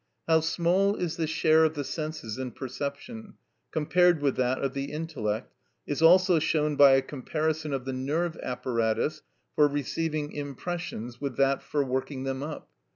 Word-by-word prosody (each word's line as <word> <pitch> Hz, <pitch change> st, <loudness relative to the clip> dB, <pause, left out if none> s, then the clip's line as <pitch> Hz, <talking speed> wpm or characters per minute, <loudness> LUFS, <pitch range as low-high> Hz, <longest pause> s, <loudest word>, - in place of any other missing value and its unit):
How 160 Hz, -1 st, +5 dB
small 175 Hz, +5 st, +2 dB
is 175 Hz, -4 st, -3 dB
the 160 Hz, -2 st, 0 dB
share 160 Hz, 0 st, +4 dB
of 160 Hz, 0 st, +2 dB
the 145 Hz, -, -2 dB
senses 155 Hz, -6 st, -5 dB
in 130 Hz, -2 st, -4 dB
perception, 145 Hz, -, -6 dB, 0.3 s
compared 175 Hz, +2 st, +3 dB
with 140 Hz, -2 st, +1 dB
that 130 Hz, 0 st, +1 dB
of 135 Hz, -, -2 dB
the 140 Hz, 0 st, -2 dB
intellect, 140 Hz, -8 st, -4 dB, 0.3 s
is 145 Hz, -, -3 dB
also 180 Hz, +1 st, +6 dB
shown 150 Hz, -1 st, +1 dB
by 140 Hz, -1 st, +8 dB
a 135 Hz, 0 st, +4 dB
comparison 155 Hz, +3 st, -2 dB
of 135 Hz, -2 st, -3 dB
the 130 Hz, -, -3 dB
nerve 155 Hz, +6 st, -1 dB
apparatus 125 Hz, +4 st, -1 dB, 0.3 s
for 150 Hz, -, +5 dB
receiving 150 Hz, +1 st, -2 dB
impressions 145 Hz, -4 st, -5 dB
with 140 Hz, -4 st, -4 dB
that 135 Hz, 0 st, +2 dB
for 145 Hz, -1 st, -1 dB
working 130 Hz, +1 st, -3 dB
them 135 Hz, 0 st, -3 dB
up. 150 Hz, +1 st, -6 dB
150 Hz, 160 wpm, -28 LUFS, 135-160 Hz, 0.3 s, by